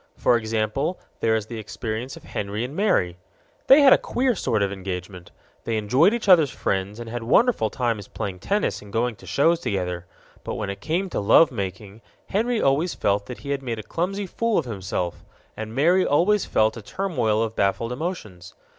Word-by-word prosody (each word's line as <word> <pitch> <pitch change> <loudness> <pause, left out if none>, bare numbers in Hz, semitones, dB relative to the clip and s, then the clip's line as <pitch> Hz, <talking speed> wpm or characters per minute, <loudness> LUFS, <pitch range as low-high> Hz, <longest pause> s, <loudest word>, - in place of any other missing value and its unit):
For - - +3
example, 115 +8 -1 0.2
there 110 0 +2
is 110 -2 -1
the 115 0 -7
experience 110 +4 -5
of - - -14
Henry 105 +2 -4
and 130 +4 -6
Mary. 90 - +1 0.5
They 275 +3 +8
had 270 -2 +8
a - - +4
queer 255 0 0
sort 110 - 0
of 100 - -1
engagement. 90 -2 -6 0.3
They 115 -1 -1
enjoyed 125 - +4
each 235 -2 -3
other's 165 -7 +6
friends 100 0 -2
and 120 - -7
had 120 +1 -4
wonderful 125 - +3
times 115 -5 -2
playing 95 -2 -5
tennis 205 - -1
and 105 - -13
going 115 +2 0
to - - -15
shows 165 +4 +3
together. 90 - -3 0.4
But - - -4
when 100 - -3
it 100 - -9
came 175 +5 -1
to - - -1
love 140 +10 +5
making, 100 0 -6 0.3
Henry 230 +3 +1
always 150 +4 +1
felt 100 0 0
that 125 - -8
he 140 - -5
had 140 -1 -1
made 120 -4 -4
a 110 - -6
clumsy 195 - -2
fool 230 +4 -1
of 160 - +1
himself, 95 -5 -4 0.3
and 110 +1 -6
Mary 175 +7 +4
always 185 +7 +2
felt 110 +1 +1
a - - -7
turmoil 120 - -1
of 110 0 -4
baffled 100 +4 0
emotions. 125 - -6
115 Hz, 195 wpm, -24 LUFS, 100-170 Hz, 0.5 s, They